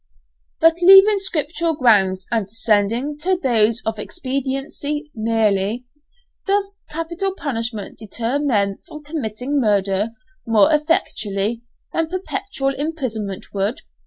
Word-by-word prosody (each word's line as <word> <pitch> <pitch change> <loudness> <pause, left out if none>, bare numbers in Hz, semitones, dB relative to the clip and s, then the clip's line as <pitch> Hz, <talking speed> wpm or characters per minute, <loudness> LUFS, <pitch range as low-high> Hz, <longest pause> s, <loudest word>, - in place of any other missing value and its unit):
But 330 +1 +4
leaving 390 +3 +8
scriptural 335 -2 -1
grounds 195 -8 +3
and 225 -4 0
descending 225 +6 0
to 370 +4 +1
those 230 -6 +2
of 220 -1 -2
expediency 275 +3 -4
merely. 220 0 +1 0.6
Does 400 0 0
capital 340 +5 -3
punishment 230 - -3
deter 230 +5 -2
men 205 -9 +1
from 300 0 -10
committing 280 -2 -3
murder 200 -1 +1 0.3
more 230 +7 +4
effectually 230 - 0 0.3
than 325 -1 0
perpetual 360 -6 -2
imprisonment 255 - -4
would? 200 +4 -1
255 Hz, 105 wpm, -20 LUFS, 215-320 Hz, 0.6 s, leaving